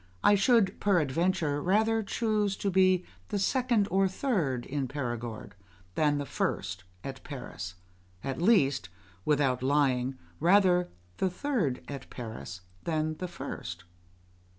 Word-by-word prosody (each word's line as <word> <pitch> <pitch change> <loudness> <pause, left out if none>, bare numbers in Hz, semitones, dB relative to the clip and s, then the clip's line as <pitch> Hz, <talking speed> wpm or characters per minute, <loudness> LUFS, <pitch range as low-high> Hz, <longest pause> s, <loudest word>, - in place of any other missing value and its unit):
] - - -31
I - - +7
should, 205 -1 +3
peradventure, 170 -3 +1
rather 220 +5 +3
choose 210 -2 0
to 200 - -1
be 185 -1 +4 0.2
the 210 - -1
second 235 0 +2
or 195 +1 +4
third 180 - -1
in 140 -1 -2
Perigord 120 -6 -4 0.4
than 150 +3 +2
the 145 - -2
first 90 -7 -2 0.2
at 135 -1 -7
Paris 120 - -7 0.5
at 135 +3 -3
least, 140 - +3 0.4
without 135 -4 +2
lying, 130 -2 +2 0.2
rather 180 -1 +4 0.3
the 190 - +1
third 180 - -1
at 140 -1 -7
Paris 110 -6 -7 0.2
than 155 -1 -1
the 180 - -3
first. 175 - -6
155 Hz, 130 wpm, -29 LUFS, 135-195 Hz, 0.5 s, I